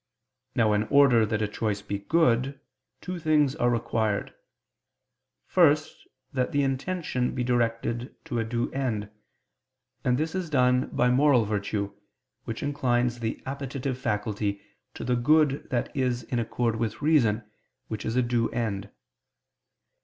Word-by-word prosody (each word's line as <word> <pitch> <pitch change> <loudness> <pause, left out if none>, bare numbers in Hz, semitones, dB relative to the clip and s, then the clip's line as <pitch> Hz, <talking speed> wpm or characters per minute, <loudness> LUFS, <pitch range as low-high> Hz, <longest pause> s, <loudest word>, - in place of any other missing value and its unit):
Now 110 -3 +3
in 105 +1 +1
order 125 -4 +5
that 105 0 -1
a - - +1
choice 105 -1 -2
be 100 - -3
good, 135 +1 +2 0.4
two 180 -1 -5
things 150 -3 +2
are 120 - +2
required. 115 -3 -1 1.1
First, 155 -4 +2 0.3
that 130 -2 0
the 145 0 +2
intention 135 -1 -1
be 125 - -1
directed 120 0 -1
to 125 -8 -2
a - - +1
due 115 +1 -2
end; 110 -6 -2 0.9
and 125 0 +2
this 160 +2 -1
is 185 -3 -3
done 125 -3 +3
by 125 0 +2
moral 130 -3 +4
virtue, 100 -1 -2 0.5
which 115 - -5
inclines 125 -4 0
the 115 -1 -3
appetitive 135 -1 -4
faculty 105 -2 -1 0.4
to - - -6
the 125 - +1
good 145 +3 +3
that 125 +4 -2
is 125 -3 0
in 120 +1 -2
accord 115 0 -1
with 115 +4 -3
reason, 120 -8 +3 0.4
which 110 - -5
is 110 - -2
a 125 - +3
due 120 -1 +1
end. 105 -4 -3
120 Hz, 145 wpm, -27 LUFS, 110-135 Hz, 1.1 s, order